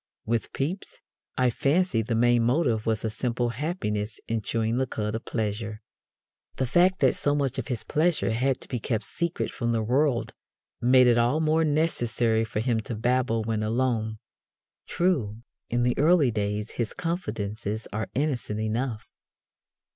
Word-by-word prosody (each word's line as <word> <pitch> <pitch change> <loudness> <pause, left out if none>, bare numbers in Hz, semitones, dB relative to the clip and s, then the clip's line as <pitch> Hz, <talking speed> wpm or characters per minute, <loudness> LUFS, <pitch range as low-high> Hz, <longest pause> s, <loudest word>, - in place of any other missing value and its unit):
With 115 0 -1
Pepys, 165 +8 -4 0.4
I 125 -1 +3
fancy, 140 0 +2
the 115 +1 -2
main 120 +1 +4
motive 120 -3 +1
was 110 0 0
a - - +1
simple 120 +1 -1
happiness 115 - -3
in 115 -1 -1
chewing 115 +2 -1
the 130 - 0
cud 105 -2 -3
of 115 +2 -4
pleasure. 105 -1 -3 0.8
The 130 - 0
fact 180 +8 +3
that - - +5
so 145 0 0
much 140 -3 0
of - - -4
his 125 -5 -3
pleasure 160 -5 +1
had 130 +3 +1
to - - -8
be 125 - -3
kept 110 0 -2
secret 170 0 -2
from 120 -2 -1
the 115 -1 0
world 130 +2 +1 0.5
made 125 +1 +6
it 120 -1 +5
all 120 +6 +2
the 160 - 0
more 160 +1 +3
necessary 120 -7 +1
for 110 -1 -2
him 115 -1 +1
to 110 +1 -5
babble 120 0 +1
when 110 -1 -1
alone. 110 -1 0 0.7
True, 120 - 0 0.3
in 120 +1 +1
the 125 0 +2
early 155 -3 +4
days 105 0 -2
his 115 -2 -3
confidences 110 - -3
are 110 +1 -3
innocent 130 -6 -1
enough. 110 +1 -2
120 Hz, 165 wpm, -26 LUFS, 110-140 Hz, 0.8 s, made